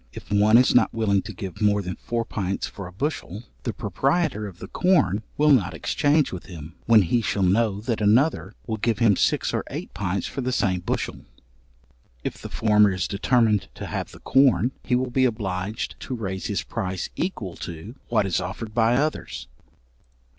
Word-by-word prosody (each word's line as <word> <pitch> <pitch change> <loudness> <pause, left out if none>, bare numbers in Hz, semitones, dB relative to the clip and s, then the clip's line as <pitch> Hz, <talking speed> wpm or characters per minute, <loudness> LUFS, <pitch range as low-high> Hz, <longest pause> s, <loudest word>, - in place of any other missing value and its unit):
If - - -11
one 105 +2 +5
is 125 - +4
not 125 - +4
willing 100 -3 +2
to - - -8
give 100 -1 -7
more 105 -1 +3
than 90 0 -4
four 115 -1 -3
pints 100 -4 -2
for 100 -2 -8
a - - -10
bushel, 110 - -4 0.2
the 120 - -2
proprietor 125 - 0
of 95 -4 -11
the - - -8
corn 145 - +2 0.2
will 150 +1 +4
not 95 -11 +3
exchange 145 - +1
with 90 - -7
him, 80 -3 -9
when 115 -3 +7
he 115 +7 +1
shall 100 -2 0
know 100 +2 +2
that 115 -1 -2
another 105 - +2
will 110 -2 -3
give 110 0 0 0.2
six - - +1
or - - 0
eight - - -6
pints 95 -1 -2
for 135 - -4
the 130 0 -1
same 95 -6 +1
bushel. 90 - -3 1.1
If - - -4
the - - -7
former 105 -2 +4
is 95 -2 -2
determined 105 0 +2
to - - -6
have - - -4
the - - -13
corn, 135 -2 +4
he 125 - +1
will 125 0 -1
be 130 +1 +3
obliged 105 -2 -3
to 130 - -5
raise 95 -5 -4
his - - -2
price 95 -1 -4
equal 110 - -3
to 85 +7 -7
what 110 -4 +2
is 90 -4 0
offered 110 -2 -6
by 115 +1 +3
others. 125 - -2
105 Hz, 190 wpm, -24 LUFS, 95-120 Hz, 1.1 s, when